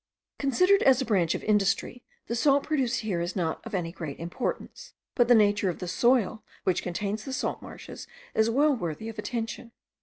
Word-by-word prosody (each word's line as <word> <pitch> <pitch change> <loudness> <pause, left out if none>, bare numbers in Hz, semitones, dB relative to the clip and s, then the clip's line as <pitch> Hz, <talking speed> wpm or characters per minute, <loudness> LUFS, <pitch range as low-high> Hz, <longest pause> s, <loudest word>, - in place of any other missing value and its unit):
Considered 365 +9 +3
as 265 -2 +5
a 265 - -1
branch 185 -8 +2
of - - -5
industry 210 +3 +1 0.2
the - - -4
salt 275 +4 +3
produced 260 -6 0
here 195 -6 -2
is 175 +1 -3
not 165 -4 -2
of 225 - -4
any 170 -3 -2
great 160 -5 -6
importance, 245 - -5 0.2
but 240 -2 +3
the 245 - +7
nature 205 -2 +3
of 175 - -3
the 180 - -6
soil 235 +2 +2 0.2
which 185 - +1
contains 205 +4 -3
the 270 - -6
salt 255 - -2
marshes - - -10 0.3
is 220 +1 +3
well 285 +4 +3
worthy 200 +1 -4
of 220 -1 -8
attention. 230 +1 -4
220 Hz, 190 wpm, -27 LUFS, 185-255 Hz, 0.3 s, the